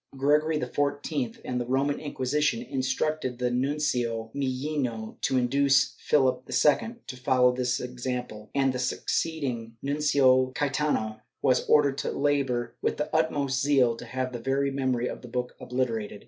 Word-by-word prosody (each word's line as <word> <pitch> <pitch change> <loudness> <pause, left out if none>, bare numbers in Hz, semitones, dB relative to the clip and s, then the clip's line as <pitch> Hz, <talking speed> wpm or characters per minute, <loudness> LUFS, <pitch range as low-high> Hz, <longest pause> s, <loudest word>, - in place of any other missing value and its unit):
Gregory 150 +3 +2
XIV 145 -4 -2
and 125 -1 -2
the - - -3
Roman 135 +3 +1
Inquisition 150 - 0
instructed 130 - -1
the 125 0 0
Nuncio 125 -4 -1
Millino 130 -4 -3
to 130 - +1
induce 140 +2 +3
Philip 130 -3 +1
II 150 - +2
to 130 - -7
follow 125 0 +3
this 125 0 -1
example, 125 -3 -5
and 135 -1 +2
the 125 - -3
succeed 160 +4 -1
ing 115 -3 -4
Nuncio 135 -3 +3
Caietano 135 -7 -1 0.2
was 130 -1 +2
ordered 140 -2 +4
to - - -2
labor 135 -5 0
with - - 0
the 150 +1 -3
utmost 140 -4 +1
zeal 135 -5 +3
to - - -8
have 130 +1 -3
the 120 - -4
very 135 +3 0
memory 130 -3 0
of - - -6
the 125 - -10
book 125 +1 -3
obliterated. 115 -5 -2
130 Hz, 150 wpm, -27 LUFS, 125-145 Hz, 0.2 s, ordered